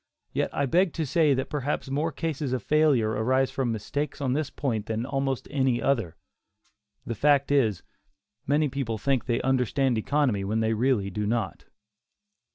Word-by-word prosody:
Yet -, -, 0 dB
I 140 Hz, -, 0 dB
beg 175 Hz, +5 st, +2 dB
to 160 Hz, -, -2 dB
say 150 Hz, -1 st, +3 dB
that 130 Hz, +1 st, -3 dB
perhaps 145 Hz, -1 st, -2 dB
more 150 Hz, +4 st, 0 dB
cases 150 Hz, -5 st, -3 dB
of 125 Hz, -5 st, -2 dB
failure 150 Hz, -8 st, +3 dB
arise 130 Hz, +5 st, +1 dB
from 130 Hz, -3 st, -1 dB
mistakes 140 Hz, +7 st, -3 dB
on 130 Hz, -3 st, 0 dB
this 150 Hz, 0 st, -1 dB
point 115 Hz, -6 st, -3 dB
than 115 Hz, +1 st, -2 dB
almost 135 Hz, -1 st, -2 dB
any 130 Hz, -4 st, +1 dB
other. 115 Hz, -12 st, 0 dB, 0.9 s
The 115 Hz, -, -3 dB
fact 140 Hz, +4 st, +3 dB
is, 115 Hz, -10 st, +2 dB, 0.6 s
many 150 Hz, +2 st, +3 dB
people 130 Hz, -5 st, -3 dB
think 135 Hz, +3 st, 0 dB
they 120 Hz, -2 st, 0 dB
understand 130 Hz, -1 st, +1 dB
economy 125 Hz, -5 st, +1 dB
when 105 Hz, +3 st, -1 dB
they 110 Hz, 0 st, +1 dB
really 110 Hz, -4 st, +1 dB
do 105 Hz, +2 st, -2 dB
not. 115 Hz, -2 st, -2 dB
130 Hz, 165 wpm, -26 LUFS, 115-145 Hz, 0.9 s, say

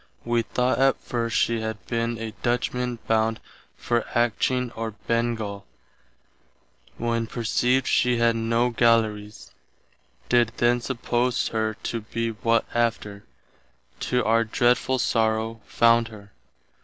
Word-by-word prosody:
Wee 120 Hz, 0 st, +1 dB
thought 125 Hz, +2 st, 0 dB
at 135 Hz, 0 st, +3 dB
first 115 Hz, -2 st, -2 dB
she 115 Hz, -1 st, +1 dB
had 110 Hz, -1 st, -5 dB
been 115 Hz, 0 st, -2 dB
a 110 Hz, -1 st, -6 dB
Dutchman 125 Hz, 0 st, -1 dB
bound 110 Hz, 0 st, +1 dB, 0.4 s
for 120 Hz, -1 st, 0 dB, 0.2 s
Atcheen 120 Hz, +1 st, +1 dB
or 110 Hz, -1 st, -4 dB
Bengall, 115 Hz, -4 st, -1 dB, 1.3 s
when 115 Hz, -1 st, -1 dB
perceived 125 Hz, +3 st, +1 dB
she 125 Hz, -1 st, +2 dB
had 115 Hz, 0 st, +3 dB
no 115 Hz, +2 st, +1 dB
Gallerys, 110 Hz, -2 st, +1 dB, 0.8 s
did 120 Hz, -2 st, +3 dB
then 120 Hz, 0 st, +2 dB
suppose 125 Hz, 0 st, -1 dB
her 110 Hz, -1 st, -1 dB
to 115 Hz, -, -3 dB
be 115 Hz, +1 st, -3 dB
what 115 Hz, +1 st, +1 dB
after, 110 Hz, -3 st, -1 dB, 0.7 s
to 125 Hz, -3 st, 0 dB
our 115 Hz, +1 st, +3 dB
dreadful 120 Hz, +3 st, +1 dB
sorrow, 110 Hz, -1 st, 0 dB
found 115 Hz, 0 st, +4 dB
her. 105 Hz, -3 st, -13 dB
115 Hz, 120 wpm, -24 LUFS, 110-120 Hz, 1.3 s, found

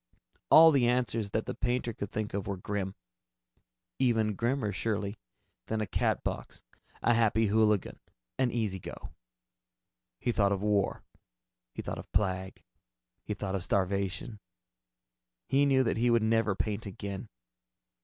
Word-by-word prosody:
All 160 Hz, +1 st, +9 dB
the 135 Hz, -5 st, +3 dB
answers 120 Hz, -4 st, 0 dB
that 110 Hz, +2 st, -1 dB
the 125 Hz, -, -3 dB
painter 120 Hz, -1 st, -1 dB
could 100 Hz, -1 st, -5 dB
think 110 Hz, -1 st, -3 dB
of 100 Hz, -1 st, -3 dB
were 100 Hz, -2 st, -2 dB
grim. 95 Hz, 0 st, -3 dB, 1.0 s
Even 115 Hz, -5 st, +2 dB
grimmer, 115 Hz, +1 st, 0 dB
surely, 105 Hz, -1 st, -2 dB, 0.5 s
than 110 Hz, -, -1 dB
a 110 Hz, -, 0 dB
Catbox, -, -, -2 dB, 0.4 s
a 120 Hz, -, +4 dB
Happy 115 Hz, -1 st, +3 dB
Hooligan, 105 Hz, -1 st, +2 dB, 0.4 s
an 130 Hz, -2 st, +3 dB
Easy 110 Hz, -5 st, -1 dB
Go. -, -, -9 dB, 1.1 s
He 120 Hz, -, 0 dB
thought 100 Hz, -3 st, +2 dB
of 100 Hz, 0 st, -3 dB
war. 105 Hz, -2 st, +1 dB, 0.7 s
He -, -, -5 dB
thought -, -, -4 dB
of -, -, -11 dB
plague. 95 Hz, -2 st, -1 dB, 0.6 s
He 105 Hz, -, -3 dB
thought 95 Hz, -2 st, -4 dB
of 95 Hz, -2 st, -1 dB
starvation. 100 Hz, +4 st, -1 dB, 1.1 s
He 140 Hz, +1 st, +3 dB
knew 135 Hz, -1 st, +4 dB
that 115 Hz, -, 0 dB
he 120 Hz, +2 st, +2 dB
would 115 Hz, -1 st, +3 dB
never 110 Hz, -2 st, +2 dB
paint 105 Hz, +1 st, -2 dB
again. 100 Hz, +2 st, -6 dB
110 Hz, 145 wpm, -30 LUFS, 100-120 Hz, 1.1 s, All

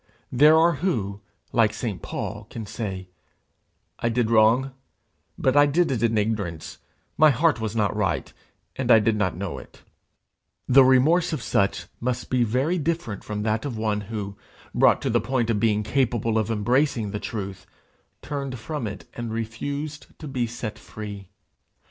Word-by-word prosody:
There 150 Hz, +5 st, +6 dB
are 165 Hz, -1 st, +4 dB
who, 105 Hz, -, -1 dB, 0.3 s
like 110 Hz, -3 st, +3 dB
St. 110 Hz, -7 st, -4 dB
Paul, 105 Hz, 0 st, -5 dB
can 115 Hz, -2 st, -6 dB
say, 95 Hz, -4 st, -5 dB, 0.9 s
'I 120 Hz, -, 0 dB
did 115 Hz, -1 st, 0 dB
wrong, 115 Hz, +4 st, +4 dB, 0.7 s
but 130 Hz, -, +1 dB
I 145 Hz, 0 st, +6 dB
did 160 Hz, +2 st, +2 dB
it 120 Hz, -5 st, -1 dB
in 115 Hz, -1 st, +2 dB
ignorance; 105 Hz, -7 st, -2 dB, 0.4 s
my 155 Hz, -, +8 dB
heart 145 Hz, 0 st, +2 dB
was 110 Hz, 0 st, -3 dB
not 105 Hz, -2 st, +1 dB
right, 105 Hz, -2 st, -1 dB, 0.4 s
and -, -, -3 dB
I -, -, +9 dB
did 110 Hz, 0 st, +2 dB
not 95 Hz, -5 st, -1 dB
know 95 Hz, -1 st, -4 dB
it:' -, -, -16 dB, 0.8 s
the 135 Hz, +1 st, +7 dB
remorse 140 Hz, +8 st, +4 dB
of 145 Hz, -, -3 dB
such 100 Hz, 0 st, 0 dB
must 125 Hz, 0 st, -3 dB
be 125 Hz, -1 st, +3 dB
very 130 Hz, +10 st, 0 dB
different 160 Hz, -, -2 dB
from 105 Hz, -1 st, -4 dB
that 110 Hz, 0 st, 0 dB
of 130 Hz, -6 st, -4 dB
one 105 Hz, -1 st, -1 dB
who, 100 Hz, -1 st, -5 dB, 0.4 s
brought -, -, +4 dB
to -, -, 0 dB
the 120 Hz, -1 st, +2 dB
point 120 Hz, 0 st, 0 dB
of 105 Hz, -, 0 dB
being 105 Hz, -2 st, +2 dB
capable 115 Hz, -1 st, +1 dB
of 110 Hz, -, -1 dB
embracing 115 Hz, 0 st, +1 dB
the 105 Hz, -, -3 dB
truth, 100 Hz, -5 st, -6 dB, 0.6 s
turned 140 Hz, -3 st, -4 dB
from 125 Hz, +1 st, -4 dB
it 105 Hz, -1 st, -8 dB
and 120 Hz, -1 st, -5 dB
refused 140 Hz, +7 st, -5 dB
to 155 Hz, -, -8 dB
be 125 Hz, -4 st, -1 dB
set 115 Hz, -2 st, -6 dB
free. 100 Hz, -3 st, -8 dB
115 Hz, 165 wpm, -24 LUFS, 105-135 Hz, 0.9 s, I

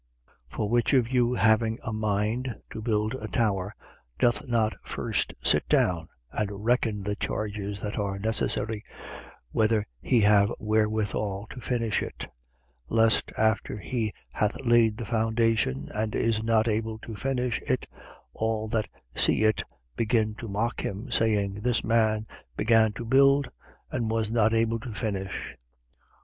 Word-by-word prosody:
14:28. -, -, -13 dB
For 105 Hz, -, -1 dB
which 120 Hz, +4 st, +2 dB
of 125 Hz, -4 st, +3 dB
you, 125 Hz, -1 st, +2 dB
having 110 Hz, +1 st, +3 dB
a 110 Hz, -, -3 dB
mind 110 Hz, +4 st, -1 dB
to 110 Hz, -, -6 dB
build 110 Hz, 0 st, 0 dB
a 130 Hz, -, -5 dB
tower, 100 Hz, -4 st, 0 dB, 0.4 s
doth 120 Hz, +3 st, +2 dB
not 115 Hz, -3 st, +2 dB
first -, -, -2 dB
sit -, -, +2 dB
down 85 Hz, -3 st, +2 dB, 0.2 s
and 105 Hz, 0 st, -3 dB
reckon 115 Hz, -4 st, +1 dB
the 105 Hz, +1 st, -1 dB
charges 105 Hz, -1 st, -3 dB
that 105 Hz, +1 st, -3 dB
are 100 Hz, -1 st, -2 dB
necessary, 110 Hz, 0 st, -1 dB, 0.7 s
whether 110 Hz, -1 st, +2 dB, 0.2 s
he 120 Hz, -, +3 dB
have 105 Hz, 0 st, +5 dB
wherewithal 105 Hz, -2 st, 0 dB
to 125 Hz, -, -8 dB
finish 115 Hz, -3 st, 0 dB
it: -, -, -6 dB
14:29. -, -, -16 dB, 0.6 s
Lest, 115 Hz, -1 st, +3 dB
after 110 Hz, -1 st, +1 dB
he 110 Hz, 0 st, -2 dB, 0.2 s
hath 105 Hz, 0 st, 0 dB
laid 115 Hz, -2 st, +4 dB
the 115 Hz, -, -5 dB
foundation 110 Hz, -, +1 dB
and 110 Hz, 0 st, -2 dB
is 110 Hz, -1 st, +1 dB
not 110 Hz, 0 st, +3 dB
able 110 Hz, 0 st, -1 dB
to 110 Hz, +1 st, -9 dB
finish 125 Hz, +1 st, -1 dB
it, -, -, 0 dB, 0.5 s
all 110 Hz, -1 st, -1 dB
that 110 Hz, -2 st, 0 dB, 0.3 s
see -, -, +2 dB
it 110 Hz, 0 st, +3 dB, 0.3 s
begin 110 Hz, -1 st, +1 dB
to 115 Hz, +1 st, -8 dB
mock 110 Hz, +4 st, -1 dB
him, 105 Hz, +7 st, -4 dB
14:30. -, -, -3 dB
Saying: 105 Hz, -3 st, +2 dB
This 120 Hz, 0 st, +1 dB
man 110 Hz, -1 st, +2 dB, 0.3 s
began 110 Hz, 0 st, +4 dB
to 115 Hz, -, -6 dB
build 140 Hz, +2 st, +4 dB, 0.4 s
and 115 Hz, -2 st, -1 dB
was 110 Hz, -1 st, 0 dB
not 110 Hz, -1 st, +3 dB
able 115 Hz, 0 st, +1 dB
to 115 Hz, -1 st, -7 dB
finish. 100 Hz, -5 st, -4 dB
110 Hz, 155 wpm, -27 LUFS, 105-115 Hz, 0.7 s, have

